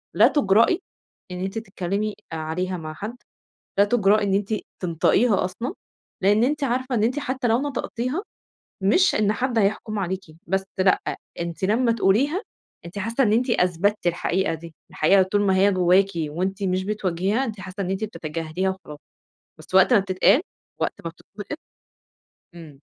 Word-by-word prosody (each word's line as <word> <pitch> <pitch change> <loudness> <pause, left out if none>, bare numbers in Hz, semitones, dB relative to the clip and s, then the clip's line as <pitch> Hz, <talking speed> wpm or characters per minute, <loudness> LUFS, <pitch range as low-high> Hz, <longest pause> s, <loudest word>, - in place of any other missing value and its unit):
لا - - +7
تُجرأي 230 - +3 0.5
إن 180 - -5
أنتِ 195 +3 -4
تتكلّمي 200 0 -3 0.2
عليها 170 +4 -3
مع 155 -1 -7
حد، 210 +8 -6 0.6
لا 200 - +7
تُجرأي 210 -1 +3
إن 195 - 0
أنتِ 205 +2 0 0.3
تنطقيها 185 +5 +2
أصلًا، 235 - -4 0.5
لإن 205 +4 +4
أنتِ 290 +2 0
عارفة 255 0 -1
إن 215 - +1
أنتِ 250 +6 +1
حتّى 260 -3 -2
لو 230 +2 +3
نطقتيها، 280 - -3 0.6
مش 360 - +4
إن 210 0 +2
حد 240 +1 -1
هيحُكم 215 +1 0
عليكِ، 190 0 -2 0.3
بس 190 +2 0
لأ، 185 0 +4 0.4
أنتِ 170 +2 -4
لمّا 230 +4 +2
تقوليها، 260 - +2 0.4
أنتِ 170 +4 -8
حاسّة 230 +6 +1
إن 210 - +2
أنتِ 245 +3 +2
أثبتِّ 180 0 +1
الحقيقة 175 +1 0
دي، 165 0 -10 0.2
الحقيقة 190 +5 +4
طول 195 +2 0
ما 190 -2 +2
هي 200 +2 +4
جوّاكِ 185 +1 +4
وأنتِ 180 +6 -2
مش 185 0 0
بتواجهيها، 200 +3 0
أنتِ 215 -6 -6
حاسّة 190 +2 -8
إن 185 - -3
أنتِ 195 +3 -1
بتتجاهليها 165 -1 -3
وخلاص، 165 -6 -9 0.6
بس - - -13
وقت 190 +6 +6
ما 225 - +7
بتتقال، 195 - +3 0.4
وقت - - 0
ما 165 - -3
بتتنقِط 205 - -9 1.0
إمم. 155 -5 -12
195 Hz, 160 wpm, -23 LUFS, 185-230 Hz, 1.0 s, لا